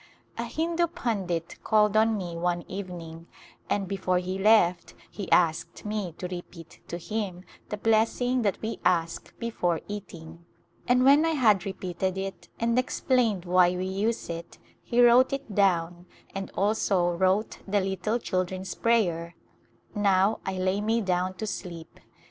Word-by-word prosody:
A - - -3
Hindu 335 +2 0
pundit 190 - -3
called 210 -1 +3
on 220 0 +4
me 175 -3 -5
one 175 0 -1
evening 170 -4 -7 0.4
and 200 -2 0
before 185 -1 0
he 185 +1 -3
left 195 -4 +3 0.2
he 200 -3 -7
asked 165 +2 +2
me 210 -5 -3
to 180 - -6
repeat 175 -2 -9
to 170 - -4
him 185 -1 -4 0.3
the 210 - -3
bless 220 +1 +2
ing 250 0 +1
that 205 -4 0
we 225 +1 -3
ask 170 -2 0
before 180 -8 -1
eating, 170 -5 -8 0.4
and 250 +1 +4
when 285 +3 +7
I 325 0 +1
had 210 -8 +3
re 195 - -3
peated 185 +1 -3
it 195 0 -6
and 230 +2 +2
explained 245 -7 +1
why 180 0 +4
we 180 +1 -2
use 205 +5 -1
it 170 0 -7 0.2
he 240 0 +1
wrote 245 +3 +6
it 275 -6 -4
down 175 -3 +1 0.3
and 195 -1 -5
also 195 -3 +2
wrote 190 +4 +1
the 205 +1 +2
little 190 +3 -1
children's 185 -3 -3
prayer 175 -8 +1 0.3
" - - -36
Now 200 0 +2
I 190 - -1
lay 185 +2 0
me 225 +2 +1
down 185 -1 0
to 220 - -4
sleep." 170 -5 -7
190 Hz, 160 wpm, -27 LUFS, 175-220 Hz, 0.4 s, when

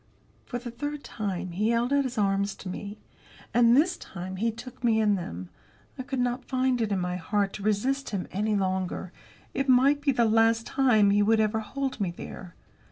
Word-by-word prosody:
For 245 - -3
the 240 0 -7
third 290 +4 -5
time 190 -5 -4
he 210 +6 0
held 235 +3 +1
out 280 -1 +3
his 250 -3 -4
arms 200 -1 +1
to 190 - -8
me. 200 +3 -6 0.6
And, 240 +1 +5
this 345 +5 +3
time, 185 0 -7
he 225 +4 +1
took 245 +3 -9
me 225 -2 +3
in 210 -1 +3
them. 90 - -5 0.5
I - - -5
could 265 +1 -4
not 245 +1 0
find 255 -2 0
it 220 -2 0
in 200 - +1
my 180 0 -2
heart 200 +2 -1
to - - -7
resist 230 +7 0
him 195 -4 -3
any 210 +2 0
longer; 185 -2 -2 0.4
it 270 0 -1
might 275 +3 +5
be 285 -1 +2
the 240 -3 +2
last 225 +1 +3
time 220 -7 +3
he 205 +1 +4
would 220 +2 +3
ever 215 0 +1
hold 260 +3 -4
me 190 - +1
there. 175 +1 -9
220 Hz, 205 wpm, -27 LUFS, 200-255 Hz, 0.6 s, And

